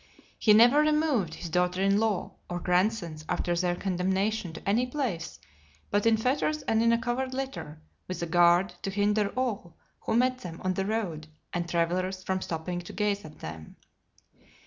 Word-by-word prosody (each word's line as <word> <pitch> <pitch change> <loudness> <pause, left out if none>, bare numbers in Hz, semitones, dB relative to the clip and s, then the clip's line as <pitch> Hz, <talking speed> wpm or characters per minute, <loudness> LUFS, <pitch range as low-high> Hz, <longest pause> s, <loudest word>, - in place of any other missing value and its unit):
LXIV. - - -27 0.2
He 215 - +5
never 240 +7 +7
removed 300 - +2
his 175 - -7
daughter 180 +1 +1
in 195 +1 +3
law, 220 -4 0 0.2
or 175 0 -3
grandsons, 180 -3 0
after 175 - 0
their 175 0 +1
condemnation, 190 +1 -1
to 160 - -10
any 230 +5 +2
place, 245 - -3 0.5
but 205 +2 +2
in 225 -1 +5
fetters 285 +6 0
and 225 0 +2
in 230 0 +4
a 235 - +4
covered 255 +2 -2
litter, 265 - -5 0.3
with 185 -1 -4
a - - 0
guard 175 +2 +4
to 195 - -3
hinder 205 +1 +1
all 210 -10 -2 0.2
who - - -2
met 255 +1 +2
them 170 -7 -8
on 185 0 +1
the 195 +1 -2
road, 185 -9 -2 0.3
and 175 -1 -2
travellers, 185 +3 0
from 190 0 -1
stopping 175 +1 -3
to 175 - -10
gaze 205 +1 0
at 155 -1 -12
them. 80 0 -8
195 Hz, 180 wpm, -28 LUFS, 175-225 Hz, 0.5 s, never